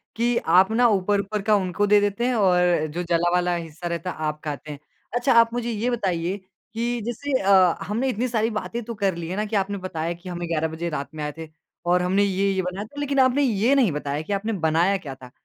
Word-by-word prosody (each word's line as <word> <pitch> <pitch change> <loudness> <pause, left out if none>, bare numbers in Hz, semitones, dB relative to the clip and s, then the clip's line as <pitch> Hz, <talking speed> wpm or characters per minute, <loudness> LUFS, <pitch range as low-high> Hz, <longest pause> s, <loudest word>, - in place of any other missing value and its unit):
कि 235 +1 +1 0.2
आप 190 +4 +5
ना 240 +2 +4
ऊपर-ऊपर 205 0 0
का 210 +1 +3
उनको 200 +1 0
दे 205 0 +6
देते 205 +4 0
हैं 255 - +1
और 180 -5 +3
जो 175 +1 -2
जला 170 0 +1
वाला 180 0 +2
हिस्सा 165 0 -6
रहता 170 +2 -3
है, - - -9
आप 155 -1 -3
खाते 150 0 -5
हैं। 145 - -8 0.4
अच्छा 250 +2 +2
आप 230 0 +3
मुझे 240 -1 -2
ये 225 +3 -1
बताइए 190 -5 -1 0.4
कि 235 +1 -2
जैसे 260 +3 -1
अ, 190 -3 +5
हमने 235 +6 0
इतनी 245 +2 -1
सारी 225 -1 0
बातें 235 +1 -5
तो 235 +1 -6
कर 195 -4 0
ली 170 -1 -5
है 185 - -4
ना 210 +1 -1
कि 215 0 -4
आपने 200 0 0
बताया 165 -1 -3
कि 175 +2 -11
हम 175 -1 -5
11 160 -1 0
बजे 160 +2 -4
रात 140 -3 -4
में 150 - -4
आए 150 - -2
थे 160 -1 -8 0.4
और 180 +1 +3
हमने 190 +3 +2
ये-ये 195 -1 +1
बनाया 185 +3 -4
था। 290 +6 -11
लेकिन 280 -1 0
आपने 260 +2 +4
ये 230 +1 +2
नहीं 250 -9 +3
बताया 145 0 -3
कि 200 - -4
आपने 210 +3 -1
बनाया 170 +5 +2
क्या 140 -8 -8
था 125 -1 -14
195 Hz, 240 wpm, -24 LUFS, 170-225 Hz, 0.4 s, दे